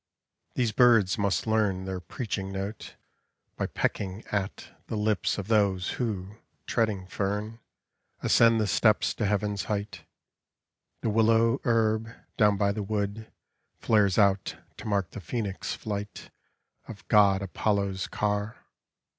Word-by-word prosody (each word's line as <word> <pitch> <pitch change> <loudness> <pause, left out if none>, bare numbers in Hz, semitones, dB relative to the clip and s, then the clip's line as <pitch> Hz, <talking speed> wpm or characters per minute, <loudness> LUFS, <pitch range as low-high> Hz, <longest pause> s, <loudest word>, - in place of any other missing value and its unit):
These 120 -3 +1
birds 110 -4 +4
must 100 -6 0
learn 105 -4 +1
Their 95 -1 -4
preaching 95 0 -4
note 100 +3 -6 0.6
by - - -2
pi 95 +2 -2
at 100 -2 -3 0.2
The - - -4
lips 105 -1 0
of 100 -2 -5
those 100 -4 +2
wi 105 -5 -3 0.4
ling 110 -5 +1
tern, 105 +4 -3 0.6
Ascend 115 -1 +5
the 110 - +2
st< 105 +1 +3 0.2
to - - -1
H - - +1 0.4
arht. 105 0 -3 1.0
The - - 0
willow 115 +3 +3
hern, 115 -2 +1 0.2
down 105 -3 +4
by 100 0 +2
the 105 +1 -3
wood 105 +1 -3 0.5
Flares 100 -4 +2
out 100 -2 +2 0.2
to - - -8
mark 100 -4 0
the 105 - -8
phoenix 100 -2 -3
flight 105 -1 -6 0.6
Oi 115 - -6
God 100 -2 +4
Apollo's 100 0 -1
car. 105 0 -2
105 Hz, 130 wpm, -27 LUFS, 100-110 Hz, 1.0 s, Ascend